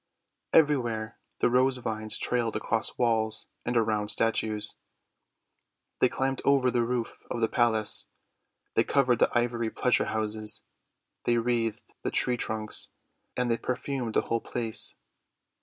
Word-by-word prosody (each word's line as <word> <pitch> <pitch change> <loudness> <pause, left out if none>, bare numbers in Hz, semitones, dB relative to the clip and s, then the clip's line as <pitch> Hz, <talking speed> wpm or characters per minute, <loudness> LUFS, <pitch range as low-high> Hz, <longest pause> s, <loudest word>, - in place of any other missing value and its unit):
Everywhere 120 -8 +2 0.2
the - - +4
Rose 130 +1 +3
Vines 110 -3 -3
trailed 120 -2 0
across 115 -1 -1
walls 110 -3 +1 0.2
and 120 0 0
around 110 -2 +1
statues; 110 -1 +1 1.2
they 130 - +5
climbed 135 +1 -1
over 135 -2 +4
the 120 - +2
roof 120 0 -2
of - - -2
the 115 - +3
palace; 110 -3 +1 0.6
they - - +4
covered 125 -4 +3
the - - +5
ivory 120 -1 0
pleasure 125 +2 +2
houses; 110 0 -2 0.6
they 120 - +3
wreathed 115 -2 -1
the - - -1
tree 125 - +1
trunks; 110 -2 -3 0.4
and 125 -1 +1
they 115 - +2
perfumed 125 -2 -3
the - - +5
whole 115 0 -1
place. 115 -2 -1
115 Hz, 135 wpm, -28 LUFS, 110-125 Hz, 1.2 s, they